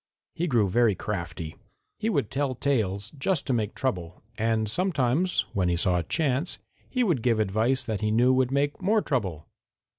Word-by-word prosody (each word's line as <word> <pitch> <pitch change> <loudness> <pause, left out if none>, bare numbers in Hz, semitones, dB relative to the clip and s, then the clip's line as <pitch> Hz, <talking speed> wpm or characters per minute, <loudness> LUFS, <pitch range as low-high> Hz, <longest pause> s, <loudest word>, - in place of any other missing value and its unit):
He 175 - -1
grew 115 - +3
very 110 +1 +3
crafty. 85 -5 -5 0.4
He 220 - 0
would 140 - 0
tell 135 -1 -1
tales 110 -7 -1
just 170 +1 0
to 130 - 0
make 110 -3 -1
trouble, 90 -11 -3
and 110 0 +1
sometimes, 160 - +1
when 90 -3 +1
he 85 - +2
saw 90 +1 +2
a - - -2
chance, 145 - 0 0.3
he 255 -1 +1
would 170 - +1
give 115 -2 +2
advice 110 +6 +1
that 110 -2 -3
he 105 - +1
knew 120 +4 +4
would 130 -1 +2
make 140 +4 0
more 210 +3 +2
trouble. 95 - -2
120 Hz, 180 wpm, -27 LUFS, 105-140 Hz, 0.4 s, knew